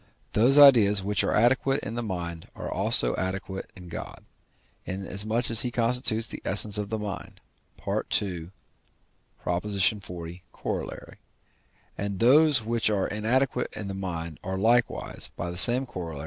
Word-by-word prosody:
Those 125 Hz, +6 st, +4 dB
ideas 110 Hz, -9 st, +6 dB
which 105 Hz, +1 st, 0 dB
are -, -, -1 dB
adequate 130 Hz, +4 st, +2 dB
in 110 Hz, -, -6 dB
the 120 Hz, -, -3 dB
mind 85 Hz, -6 st, -6 dB
are -, -, -8 dB
adequate -, -, -5 dB
also 95 Hz, +8 st, +1 dB
in 90 Hz, -1 st, -12 dB
God, 85 Hz, -, -9 dB, 0.6 s
inasmuch 105 Hz, +5 st, -3 dB
as 115 Hz, -, +2 dB
he 125 Hz, -, -2 dB
constitutes 115 Hz, -1 st, +1 dB
the -, -, -6 dB
essence 105 Hz, +1 st, +3 dB
of 100 Hz, -1 st, -4 dB
the 110 Hz, -, -3 dB
mind 105 Hz, -3 st, -7 dB, 0.5 s
(II. -, -, 0 dB, 1.4 s
xl. -, -, -27 dB
Coroll.), 90 Hz, -2 st, -3 dB, 0.9 s
and 100 Hz, -1 st, -3 dB
those 140 Hz, +2 st, +5 dB
which 115 Hz, -1 st, +1 dB
are 100 Hz, -3 st, 0 dB
inadequate 125 Hz, +4 st, -1 dB
in 105 Hz, -, -5 dB
the 100 Hz, -, -5 dB
mind 85 Hz, -4 st, -6 dB
are 95 Hz, +1 st, -4 dB
likewise 115 Hz, +4 st, 0 dB
(by 90 Hz, -, -5 dB
the -, -, -7 dB
same 120 Hz, +8 st, +6 dB
Coroll.) 85 Hz, -, -7 dB
105 Hz, 145 wpm, -26 LUFS, 95-120 Hz, 1.4 s, ideas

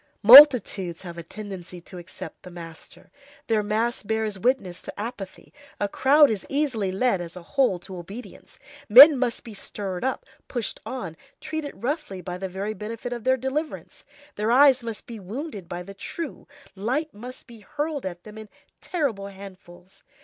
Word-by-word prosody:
Multitudes 225 Hz, -, +8 dB
have 170 Hz, -2 st, -8 dB
a -, -, -5 dB
tendency 185 Hz, -1 st, -9 dB
to 180 Hz, +1 st, -10 dB
accept 175 Hz, +1 st, -10 dB
the 180 Hz, -, -11 dB
master. 165 Hz, -2 st, -12 dB, 0.3 s
Their 220 Hz, -2 st, +1 dB
mass 220 Hz, +3 st, -1 dB
bears 220 Hz, -2 st, -2 dB
witness 210 Hz, -6 st, 0 dB
to -, -, -9 dB
apathy. 210 Hz, -3 st, -7 dB, 0.3 s
A 205 Hz, -, 0 dB
crowd 280 Hz, +6 st, +4 dB
is 205 Hz, -3 st, -3 dB
easily 260 Hz, -9 st, -1 dB
led 195 Hz, -1 st, +1 dB
as 170 Hz, 0 st, -8 dB
a 180 Hz, -, -9 dB
whole 250 Hz, -1 st, +1 dB
to 185 Hz, -, -10 dB
obedience. 195 Hz, +8 st, -10 dB, 0.3 s
Men 280 Hz, +8 st, +11 dB
must 250 Hz, -3 st, -2 dB
be 225 Hz, -, -10 dB
stirred 195 Hz, -1 st, -6 dB
up, 265 Hz, -, -2 dB, 0.2 s
pushed 240 Hz, -4 st, -3 dB
on, 215 Hz, -11 st, -5 dB, 0.2 s
treated 310 Hz, -5 st, -6 dB
roughly 280 Hz, -, -3 dB
by 180 Hz, 0 st, -6 dB
the 190 Hz, 0 st, -4 dB
very 195 Hz, +4 st, -4 dB
benefit 225 Hz, +4 st, -6 dB
of 240 Hz, -1 st, -7 dB
their 260 Hz, 0 st, +3 dB
deliverance, 270 Hz, +5 st, -5 dB, 0.3 s
their 210 Hz, +2 st, -1 dB
eyes 265 Hz, 0 st, +6 dB
must 230 Hz, -3 st, -6 dB
be 230 Hz, -2 st, -9 dB
wounded 205 Hz, -, -7 dB
by 175 Hz, 0 st, -5 dB
the 195 Hz, +2 st, -10 dB
true, 320 Hz, +11 st, -7 dB, 0.3 s
light 260 Hz, +10 st, -2 dB
must 250 Hz, +5 st, -10 dB
be 235 Hz, -2 st, -13 dB
hurled 295 Hz, +7 st, -4 dB
at 175 Hz, -2 st, -6 dB
them 215 Hz, 0 st, -11 dB
in 215 Hz, -1 st, -11 dB, 0.3 s
terrible 255 Hz, -, -2 dB
handfuls. 190 Hz, -1 st, -13 dB
215 Hz, 170 wpm, -24 LUFS, 190-255 Hz, 0.3 s, Men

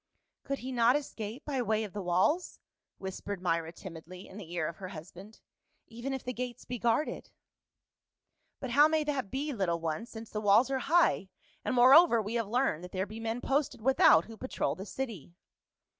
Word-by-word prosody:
"Could 275 Hz, 0 st, -3 dB
he 260 Hz, +1 st, -6 dB
not 240 Hz, 0 st, +4 dB
escape 245 Hz, -3 st, -5 dB
by 275 Hz, -4 st, -1 dB
way 220 Hz, -2 st, 0 dB
of 205 Hz, -, -7 dB
the 205 Hz, -, -4 dB
walls?" 185 Hz, -, +1 dB, 0.4 s
whis 190 Hz, -1 st, -6 dB
pered 200 Hz, -2 st, -4 dB
Myra 165 Hz, -2 st, -1 dB
timidly 180 Hz, +1 st, -10 dB
in 195 Hz, -, -12 dB
the 180 Hz, -6 st, -9 dB
ear 175 Hz, -3 st, -1 dB
of 165 Hz, -, -7 dB
her 190 Hz, -, -7 dB
husband; 185 Hz, +4 st, -11 dB, 0.2 s
" -, -, -46 dB
even 235 Hz, +4 st, -6 dB
if 265 Hz, -1 st, -4 dB
the 250 Hz, -, -4 dB
gates 250 Hz, 0 st, -6 dB
be 245 Hz, -1 st, -5 dB
guarded." 235 Hz, +6 st, 0 dB, 0.7 s
" -, -, -52 dB
But 260 Hz, -3 st, -5 dB
how 290 Hz, +4 st, +7 dB
may 315 Hz, -1 st, +1 dB
that 280 Hz, -8 st, -2 dB
be, 285 Hz, +5 st, -3 dB
little 180 Hz, -7 st, 0 dB
one, 165 Hz, +7 st, -3 dB
since 225 Hz, -1 st, -10 dB
the 215 Hz, -, -3 dB
walls 215 Hz, +6 st, +4 dB
are 265 Hz, -, 0 dB
high, 305 Hz, -, +2 dB, 0.3 s
and -, -, -1 dB
moreover, 260 Hz, +2 st, +7 dB
we 215 Hz, +1 st, -3 dB
have 230 Hz, -3 st, -1 dB
learned 235 Hz, -, 0 dB
that 180 Hz, -, -10 dB
there 190 Hz, 0 st, -1 dB
be 215 Hz, +2 st, -9 dB
men 225 Hz, +2 st, -3 dB
posted 275 Hz, -2 st, 0 dB
without 245 Hz, -9 st, +5 dB
who 225 Hz, 0 st, -11 dB
patrol 260 Hz, -, -2 dB
the 195 Hz, +2 st, -8 dB
city 205 Hz, -, -6 dB
225 Hz, 205 wpm, -31 LUFS, 190-265 Hz, 0.7 s, how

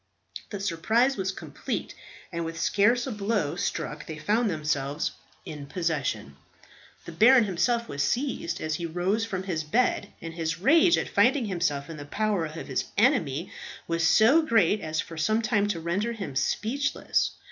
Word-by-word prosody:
The 205 Hz, -, -5 dB
surprise 220 Hz, +8 st, +1 dB
was 190 Hz, -1 st, -1 dB
complete, -, -, -5 dB, 0.4 s
and 170 Hz, -1 st, -3 dB
with 165 Hz, 0 st, -5 dB
scarce 235 Hz, +4 st, +3 dB
a 265 Hz, -, -4 dB
blow 205 Hz, -7 st, -1 dB
struck 150 Hz, -3 st, -3 dB
they 155 Hz, -, -6 dB
found 215 Hz, +8 st, +1 dB
themselves 150 Hz, -3 st, -1 dB, 0.3 s
in 145 Hz, -2 st, -7 dB
possession. 140 Hz, -, -2 dB, 0.7 s
The -, -, -7 dB
baron 235 Hz, +8 st, +6 dB
himself 235 Hz, +5 st, 0 dB
was 140 Hz, -6 st, -3 dB
seized 240 Hz, -, -1 dB
as 155 Hz, 0 st, -2 dB
he 170 Hz, +2 st, -3 dB
rose 185 Hz, +7 st, 0 dB
from 190 Hz, -4 st, -4 dB
his 170 Hz, -5 st, -2 dB
bed, 205 Hz, +4 st, 0 dB
and 165 Hz, 0 st, -7 dB
his 165 Hz, 0 st, -2 dB
rage 320 Hz, -, +5 dB
at -, -, -1 dB
finding 245 Hz, +5 st, +3 dB
himself 170 Hz, -8 st, -1 dB
in 165 Hz, -, -8 dB
the 145 Hz, -, -8 dB
power 205 Hz, +1 st, 0 dB
of 155 Hz, +2 st, -8 dB
his -, -, -1 dB
enemy 190 Hz, -, +2 dB, 0.4 s
was 165 Hz, -1 st, +1 dB
so 245 Hz, -, +6 dB
great 225 Hz, -7 st, +2 dB
as 155 Hz, 0 st, -3 dB
for 165 Hz, -, -5 dB
some 215 Hz, +8 st, +2 dB
time 210 Hz, -2 st, +2 dB
to 195 Hz, -5 st, -2 dB
render 190 Hz, +8 st, -1 dB
him 195 Hz, -, -6 dB
speechless. 245 Hz, -, 0 dB
185 Hz, 170 wpm, -27 LUFS, 160-225 Hz, 0.7 s, baron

